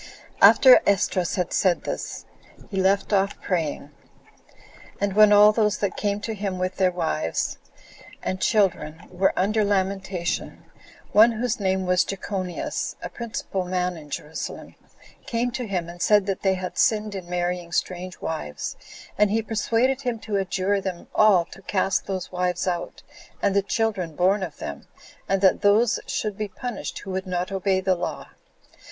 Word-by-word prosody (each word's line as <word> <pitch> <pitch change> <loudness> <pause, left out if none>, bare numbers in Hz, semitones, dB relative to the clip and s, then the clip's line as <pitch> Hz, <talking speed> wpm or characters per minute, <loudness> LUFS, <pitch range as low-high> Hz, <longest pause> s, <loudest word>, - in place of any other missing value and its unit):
4. - - +10
After 260 -2 +7
Esdras 185 -2 +1
had 180 -2 -2
said 185 -3 +2
this, - - -5 0.5
he 195 -1 0
left 195 +2 +1
off 200 0 +1
praying; 155 -5 -2 1.1
and 200 -1 0
when 210 +1 +6
all 210 +1 +8
those 210 -1 +1
that 200 -3 -2
came 205 -1 -1
to 225 0 -3
him 200 -3 -3
with 185 0 -2
their 185 -1 +3
wives 80 - -2 0.6
and 185 - -3
children 170 -7 +1
were 185 +2 +2
under 215 +3 +2
lamentation, 195 -3 -2 0.5
one 225 +3 +6
whose 240 +1 -2
name 190 -1 0
was 180 0 +3
Jechonias, 190 -2 -4
a - - -4
principal 220 -5 -4
man 180 0 -1
in 150 -3 -11
Jerusalem, 150 +2 -6 0.5
came 240 +1 -1
to 245 -1 -4
him, 180 -4 -2
and 175 +1 -10
said 205 -2 +4
that 195 -1 -2
they 190 -1 +2
had 185 -1 -5
sinned 215 -1 +2
in 185 -3 -7
marrying 175 -1 -2
strange 180 +1 -3
wives; 75 - -4 0.4
and 210 -1 +5
he 220 +2 0
persuaded 230 +4 0
him 245 -4 -2
to 210 -2 -2
adjure 195 +1 0
them 185 -2 -6
all 200 -5 +5
to 195 - -12
cast 195 0 0
those 185 -2 -4
wives 180 0 -1
out, 175 -1 -3 0.4
and 200 -1 +1
the 200 - +4
children 200 -6 -1
born 190 +4 +2
of 170 -5 -5
them, 70 - -7 0.4
and 195 0 +1
that 190 - +4
those 220 +3 +3
should 210 -2 -3
be 210 - -1
punished 245 +4 -6
who 195 - -7
would 190 +1 -3
not 180 +1 -2
obey 190 0 +1
the 190 0 +2
law. 175 - -5
195 Hz, 165 wpm, -24 LUFS, 180-210 Hz, 1.1 s, 4